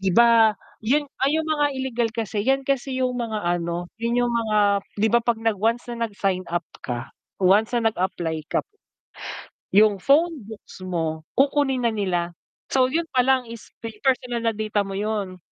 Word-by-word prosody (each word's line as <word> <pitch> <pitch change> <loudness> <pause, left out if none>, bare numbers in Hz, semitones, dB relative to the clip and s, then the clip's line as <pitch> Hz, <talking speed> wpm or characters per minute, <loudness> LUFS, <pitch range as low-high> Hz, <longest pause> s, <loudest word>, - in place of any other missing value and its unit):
'di 190 -1 +1
ba 230 -2 +6 0.2
yun 275 +7 +1 0.2
ay 290 - +2
yung 320 - 0
mga 295 -2 +2
illegal 245 -3 -1
kasi 220 -2 -2
'yan 270 0 +3
kasi 265 -1 -1
yung 250 - 0
mga 220 -3 -3
ano, 175 0 -1 0.2
yun 235 +1 +1
yung 240 - -1
mga 210 -3 +2 0.2
'di 220 +2 +2
ba 235 - +6
'pag 235 -1 +1
nag 220 -3 +1
once 230 +2 +1
na 235 0 -1
nag-sign 195 -3 -2
up 175 0 -1 0.2
ka, 120 -1 -5 0.3
once 210 +6 +4
na 225 -2 +3
nag-apply 170 -6 -3
ka, - - 0 1.1
yung 205 -1 +4
phonebooks 275 - 0
mo 165 -4 -2 0.2
kukunin 270 -2 +2
na 230 - +2
nila. 175 -4 -1 0.4
So, 260 -1 +4
yun 330 +4 0
pa 255 - +5
lang 260 0 +2
is 230 -1 -10
pe 230 -1 -7
personal 250 -3 0
na 230 -1 +1
data 215 -1 0
mo 195 -1 -4
yun. 205 -3 -2
225 Hz, 180 wpm, -23 LUFS, 195-250 Hz, 1.1 s, ba